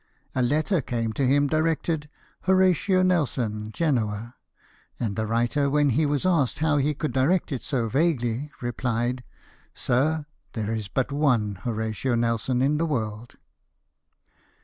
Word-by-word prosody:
A 130 - 0
letter 155 - +1
came 115 -3 -2
to 135 +3 +1
him 145 +2 +4
directed 155 0 0 0.2
" - - -35
Horatio 185 0 +3
Nelson, 120 -12 0
Genoa; 115 -6 -1 0.3
" - - -34
and 105 -4 -2
the 110 0 -2
writer, 120 +5 +1
when 145 0 +3
he 150 +6 +2
was 145 +3 -1
asked 165 -9 +2
how 155 -1 +2
he 145 +1 +1
could 150 0 -2
direct 150 +8 +2
it 135 - -2
so 125 -6 -1
vaguely, 135 -1 0
replied, 120 0 -1 0.3
" - - -31
Sir, 145 +5 +1 0.3
there 110 -1 -2
is 110 -3 -3
but 130 +6 -1
one 125 -8 +2
Horatio 110 +2 -1
Nelson 115 +2 0
in 150 +2 +2
the 165 - +1
world." 115 -5 -3
130 Hz, 150 wpm, -25 LUFS, 115-150 Hz, 0.3 s, him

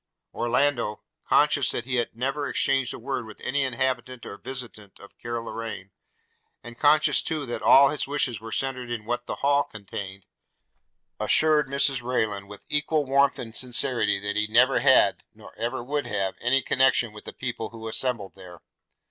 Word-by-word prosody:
Orlando, 120 -3 0 0.2
conscious - - +3
that 120 - -2
he 125 0 -1
had 120 - -2
never 135 +4 -2
exchanged 135 -2 +1
a - - -6
word 125 -1 -4
with 110 - -12
any 140 +3 -1
inhabitant 130 -1 -2
or - - -7
visitant 115 -4 -8
of 100 - -15
Carloraine, 115 -4 -6 0.7
and 120 0 -11
conscious 150 +1 +4
too 155 -3 -2
that 120 - -5
all 140 +1 +7
his 150 -1 -3
wishes 135 -6 -1
were 115 0 -8
centred 130 -2 -2
in 115 -3 -4
what 120 +1 -3
the - - -3
Hall 145 0 +4
contained, 100 -3 -8 0.9
assured 155 -1 +3
Mrs 140 -1 +1
Rayland 110 -5 -1
with 105 0 -12
equal 150 0 +1
warmth 140 +1 +3
and 115 -1 -7
sincerity 125 -4 +1
that 105 +1 -3
he 105 0 +1
never 125 +5 +4
had, 135 -2 +4
nor - - -14
ever 120 +2 -3
would 145 +3 -2
have, 95 -2 -1
any 130 +3 +2
connexion 125 -4 +2
with 105 - -12
the - - -6
people 120 -3 -4
who 115 -1 -9
assembled 110 -3 -2
there. 90 -3 -13
120 Hz, 170 wpm, -25 LUFS, 110-135 Hz, 0.9 s, all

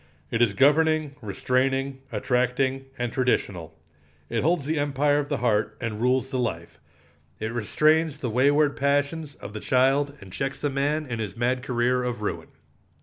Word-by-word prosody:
It 115 - 0
is 105 -4 +3
governing, 155 +1 +3
restraining, 130 +5 -1
attracting, 130 +1 0
and 120 -1 -2
traditional. 100 -10 -1 0.5
It - - 0
holds 160 -1 +1
the 155 +1 0
empire 145 0 +2
of 145 0 -3
the 145 - 0
heart 105 -3 0
and 115 -3 -4
rules 130 +2 +1
the 130 - -1
life. 85 -9 -4 0.6
It 110 +1 -3
restrains 155 +7 +2
the 125 -5 -3
wayward 145 +4 +3
passions 145 +2 0
of 100 - -10
the 110 - -5
child 135 +4 +2
and 95 -2 -12
checks 135 0 -3
the 145 - -2
man 145 +3 0
in 115 -4 -4
his 105 -4 -5
mad 125 +2 0
career 125 0 +1
of 120 -3 -3
ruin. - - -3
130 Hz, 165 wpm, -25 LUFS, 120-145 Hz, 0.6 s, is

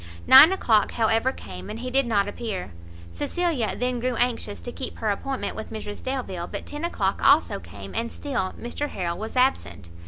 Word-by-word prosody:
Nine 275 +6 +10
o'clock, 225 - +2
however, 225 +3 +2
came, 90 - -9
and 220 - -5
he 250 +2 -5
did 270 -1 +2
not 205 -3 +2
appear; 205 - -5 0.4
Cecilia 275 - -1
then 250 0 -1
grew 250 +1 -1
anxious 230 -4 -1
to 245 - -6
keep 260 - -6
her 215 -2 0
appointment 265 +6 -3
with 220 - -6
Mrs 215 -2 -6
Delvile; 245 -10 -4
but - - -6
ten 295 +2 -6
o'clock 340 - -1
also - - +4
came, - - -10
and 230 +1 -2
still 245 -10 -3
Mr 285 +5 -4
Harrel 170 -2 -3
was 220 +3 -6
absent. 95 - 0
235 Hz, 185 wpm, -25 LUFS, 205-260 Hz, 0.4 s, Nine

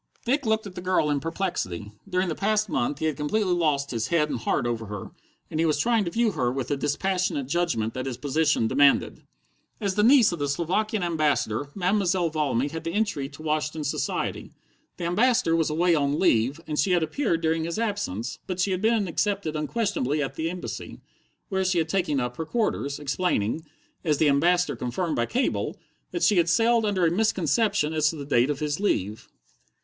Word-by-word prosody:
Dick 270 +1 +1
looked 220 0 +1
at 200 - -8
the 180 - -7
girl 180 -5 +1
in 145 - +1
perplexity. 150 - -3 0.2
During 185 0 +1
the 165 - -1
past 215 +3 0
month 135 -1 -1
he 160 - -3
had 155 -2 0
completely 180 +7 0
lost 150 -5 +1
his 115 -3 -1
head 155 -3 +1
and - - -2
heart 120 - 0
over 115 -2 -2
her, 105 -1 -7 0.4
and 155 - -2
he 165 - +3
was 155 - +2
trying 230 -3 +2
to - - -1
view 225 +4 +1
her 125 -9 0
with 130 -1 -3
the 145 - +1
dispassionate 150 +1 -1
judgment 130 -8 0
that 130 +1 -4
his 125 -3 -4
position 145 -2 +1
demanded. 140 +3 +3 0.6
As 200 -4 -1
the 210 - +1
niece 240 -1 +6
of 170 - -4
the 145 0 -1
Slovakian 185 +7 0
Ambassador, 150 -6 0
Mademoiselle 185 -3 +1
Valmy 145 -4 0
had 160 +2 -6
the 165 - -3
entry 195 -11 -1
to 145 +2 -12
Washington 155 0 -1
society. 145 - -2 0.5
The - - -6
Ambassador 210 +1 +2
was 165 -2 +1
away 170 +3 +2
on 145 -2 +1
leave, 135 -4 +2
and 150 -1 -3
she 180 +5 +2
had 175 -2 +3
appeared 170 - -1
during 160 0 0
his 170 +3 -3
absence, 200 - -3
but 185 -1 -4
she 190 +2 +1
had 185 0 -1
been 220 -2 +2
accepted 195 -2 -1
unquestionably 155 - -1
at 135 -2 -2
the 160 +4 -2
Embassy, 180 +1 -6 0.5
where 190 -2 0
she 185 -1 +1
had 160 -1 +1
taken 175 -7 0
up 125 -1 -3
her 160 - -3
quarters, 160 - -1
explaining 150 - -1 0.4
as 150 -3 +1
the 155 0 +4
Ambassador 175 +6 +2
confirmed 155 +7 -2
by 120 - 0
cable 255 +3 -1 0.3
that 350 - -3
she 205 - +4
had 170 -1 +3
sailed 230 +3 +3
under 190 -4 +1
a 165 - +3
misconception 195 -2 +1
as 155 -1 +3
to 165 - -4
the 145 -2 -6
date 130 -2 +2
of 145 0 -2
his 150 +1 -1
leave. 110 - -1
165 Hz, 205 wpm, -25 LUFS, 145-190 Hz, 0.6 s, niece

